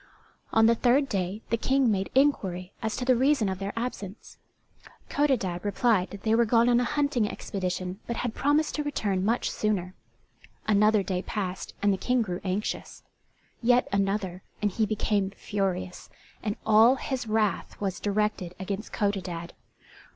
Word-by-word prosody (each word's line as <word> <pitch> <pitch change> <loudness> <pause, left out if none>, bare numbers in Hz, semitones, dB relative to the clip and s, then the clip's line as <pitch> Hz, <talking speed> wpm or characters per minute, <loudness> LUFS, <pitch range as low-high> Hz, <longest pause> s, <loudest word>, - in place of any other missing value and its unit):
On 225 0 +5
the 230 - +6
third 250 +4 +3
day 195 -1 -2
the 230 - +3
King 265 0 +2
made 195 -1 -1
inquiry 190 -10 +1
as 220 -2 -2
to 250 - -2
the 255 0 +5
reason 265 -2 +3
of 190 -1 -3
their 195 0 -3
absence. 230 -4 -6 0.7
Codadad 240 -12 0
replied 205 -2 +2
that 200 0 -10
they 220 - +2
were 235 +1 +5
gone 230 +1 +3
on 240 0 +4
a - - +2
hunting 280 -5 +1
expedition 185 0 -4
but 235 - -2
had 240 -1 -2
promised 295 +4 +1
to 300 - -1
return 205 -10 -1
much 230 +4 +1
sooner. 190 -4 -1 0.7
Another 210 0 +4
day 185 -1 -2
passed 190 -2 -4
and 205 -1 +4
the - - -1
King 250 +3 +1
grew 180 -4 -4
anxious; 195 +2 -3 0.6
yet 245 +1 +4
another, 195 -2 -1 0.2
and 210 -1 0
he 215 +2 0
became 205 -2 0
furious; 185 -3 -3 0.3
and 210 -1 -2
all 220 +4 +6
his 260 -2 -4
wrath 215 -2 0
was 195 -3 -2
directed 205 -3 -1
against 195 +2 -4
Codadad. 180 -4 -2
210 Hz, 160 wpm, -27 LUFS, 190-240 Hz, 0.7 s, the